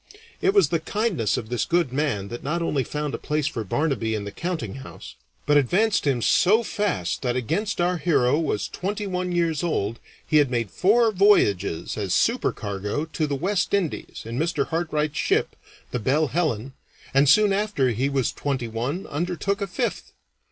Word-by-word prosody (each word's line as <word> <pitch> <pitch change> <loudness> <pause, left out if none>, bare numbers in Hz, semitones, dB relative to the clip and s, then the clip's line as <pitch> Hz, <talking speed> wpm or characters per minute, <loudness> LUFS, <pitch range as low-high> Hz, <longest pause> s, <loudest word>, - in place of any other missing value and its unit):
It 390 +1 +2
was 400 - +5
the 165 - +1
kindness 185 - 0
of 110 - -5
this 125 -1 0
good 170 -7 +1
man 130 -9 -1
that 120 - -6
not 170 +4 -2
only 145 -5 0
found 150 +3 -4
a - - -3
place 150 -1 -1
for 130 -7 -2
Barnaby 115 -1 -1
in 105 - -3
the 100 - -6
countinghouse, 135 - -6 0.3
but 145 0 +4
advanced 190 - +2
him 125 -4 +1
so 215 +6 +4
fast 200 - -2
that 125 -2 -1
against 195 - -1
our 175 +1 +2
hero 145 -4 +2
was 155 -10 -1
twenty 205 +3 -4
one 180 -1 -2
years 170 -4 +1
old 115 -10 -1 0.3
he 155 - +3
had 145 -3 +4
made 115 -5 -1
four 225 +4 +3
voyages 105 - +2
as 100 -3 0
supercargo 105 +9 0
to 155 -3 0
the 140 - -1
West 190 +6 0
Indies 185 -6 -3
in 115 +3 -4
Mr. 160 -3 0
Hartright's 155 -3 -1
ship, - - +1 0.4
the 125 - -1
Belle 140 +6 +1
Helen, 135 -7 -1 0.4
and 135 +1 +4
soon 210 +5 +5
after 195 -11 +1
he 130 +5 0
was 135 -3 0
twenty 135 -4 -2
one 125 - -3
undertook 180 +6 -2
a 200 - -1
fifth. 235 +6 -3
150 Hz, 180 wpm, -24 LUFS, 125-180 Hz, 0.4 s, was